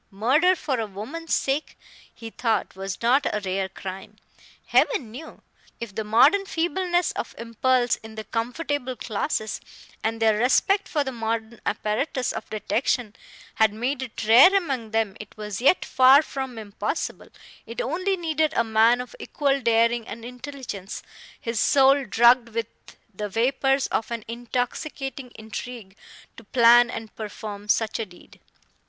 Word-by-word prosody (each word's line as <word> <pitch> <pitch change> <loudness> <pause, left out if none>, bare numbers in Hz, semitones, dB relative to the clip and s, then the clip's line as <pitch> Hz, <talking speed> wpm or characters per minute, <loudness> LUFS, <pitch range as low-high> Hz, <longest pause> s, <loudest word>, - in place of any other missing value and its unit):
Murder 270 - +3
for 280 -7 -2
a 220 - -2
woman's 265 +12 -4
sake, 275 +3 -2 0.3
he 225 -1 -10
thought, 230 -5 -1
was 195 +2 -6
not 260 +5 +3
a 210 - -1
rare 190 0 -2
crime, 190 +2 -8 0.5
Heaven 275 - +2
knew! 295 +8 -10 0.4
If 235 -4 -6
the 220 - -3
modern 270 - +4
feebleness 350 0 0
of - - -6
impulse 240 +2 +1
in 220 0 -12
the 220 - -5
comfortable 250 +4 -3
classes, 215 0 -3 0.4
and 225 +1 -1
their 220 -2 +3
respect 390 - +3
for 295 -3 0
the 265 - -4
modern 225 -1 -4
apparatus 230 +5 -1
of - - -7
detection, 220 +1 -1 0.4
had 220 -1 +3
made 250 +5 -2
it 235 -3 -5
rare 255 - +8
among 270 - -1
them, 220 -3 0
it 210 0 -11
was 210 0 -5
yet 280 +8 +4
far 265 +3 +6
from 265 -5 -5
impossible; 210 +5 -4 0.4
it 230 - -7
only 370 +9 -1
needed 315 -2 0
a 230 - +3
man 225 +2 +3
of 250 - -10
equal 275 -2 0
daring 230 0 +2
and 230 +2 -8
intelligence, 250 -6 -7 0.4
his 230 -2 -3
soul 275 0 +4
drugged 235 +2 +4
with 230 0 -2 0.5
the 210 +2 -4
vapors 270 +5 +1
of 220 - -1
an 230 -2 -5
intoxicating 250 +3 -4
intrigue, 220 -2 -8 0.4
to 230 - -11
plan 240 +2 +6
and 225 -2 -7
perform 210 -1 -7
such 220 +1 +1
a 225 - -2
deed. 175 -1 -18
235 Hz, 150 wpm, -24 LUFS, 220-270 Hz, 0.5 s, rare